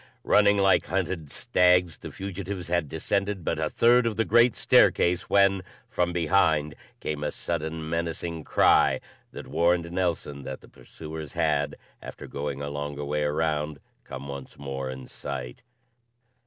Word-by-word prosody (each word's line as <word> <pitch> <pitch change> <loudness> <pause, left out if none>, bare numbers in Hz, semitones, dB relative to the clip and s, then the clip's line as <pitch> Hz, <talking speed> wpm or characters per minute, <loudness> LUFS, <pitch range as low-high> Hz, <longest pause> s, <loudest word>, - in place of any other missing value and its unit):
Running 100 -1 +4
like 95 -1 +4
hunted 90 -5 -2
stags, 90 0 +2
the - - -8
fugitives 95 -2 -6
had 85 -4 0
descended 100 0 -2
but - - -1
a - - 0
third 120 0 +4
of 110 - -1
the 115 +2 +1
great 120 +1 +4
staircase, 90 +1 +3
when, 100 -1 +4 0.3
from 90 0 0
behind, 80 -3 +2 0.3
came 75 -1 -4
a - - 0
sudden, 80 -1 -4
menacing 85 0 -3
cry - - +4 0.3
that - - -8
warned 85 0 +1
Nelson 85 -6 -2
that 65 -1 -7
the - - -16
pursuers 80 +4 -9
had, 75 -3 0 0.3
after - - -9
going 70 0 -4
a 70 - -4
longer 75 0 -4
way 75 +1 -1
around, 75 0 -1 0.2
come 65 +1 -8
once 70 -1 -8
more 70 -2 -5
in 65 0 -7
sight. 65 -3 -7
80 Hz, 150 wpm, -26 LUFS, 75-90 Hz, 0.3 s, Running